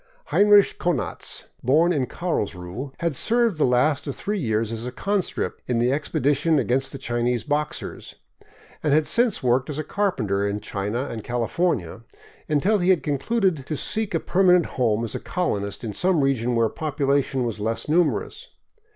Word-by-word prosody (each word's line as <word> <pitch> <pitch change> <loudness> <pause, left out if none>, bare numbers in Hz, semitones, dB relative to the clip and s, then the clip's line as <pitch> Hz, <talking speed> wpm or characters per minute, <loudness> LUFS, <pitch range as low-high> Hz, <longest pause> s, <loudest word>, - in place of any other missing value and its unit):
Heinrich 205 0 +5
Konanz, 175 -5 -2 0.2
born 160 +8 +3
in 135 -5 0
Karlsruhe, 110 - -4
had 170 -4 0
served 230 - +2
the - - +4
last 130 +4 +2
of 140 - -3
three 210 0 -3
years 110 - -1
as 115 +1 -4
a - - -4
conscript 195 +8 -2
in 125 - 0
the 120 +3 +2
expedition 145 +2 +1
against 130 +1 +1
the - - -6
Chinese 120 -2 -1
Boxers, 150 0 -3 0.7
and 150 -2 +2
had 155 0 +3
since 235 - +2
worked 125 +2 +2
as 150 - -4
a 155 - -2
carpenter 115 - -1
in 100 +1 -2
China 105 +5 -3
and 110 -5 -6
California, 120 - -1 0.5
until 185 +8 +2
he 180 +1 +1
had 185 -3 +3
concluded 165 - 0
to 155 - -3
seek 215 +5 0
a - - +2
permanent 180 -2 +3
home 115 -3 0
as 115 - -4
a - - -3
colonist 100 - -2
in 110 -3 -4
some 180 - +2
region 125 -3 +1
where 115 -1 +3
population 140 -1 0
was 115 -2 -4
less 115 +2 -2
numerous. 175 - 0
140 Hz, 170 wpm, -23 LUFS, 120-175 Hz, 0.7 s, Heinrich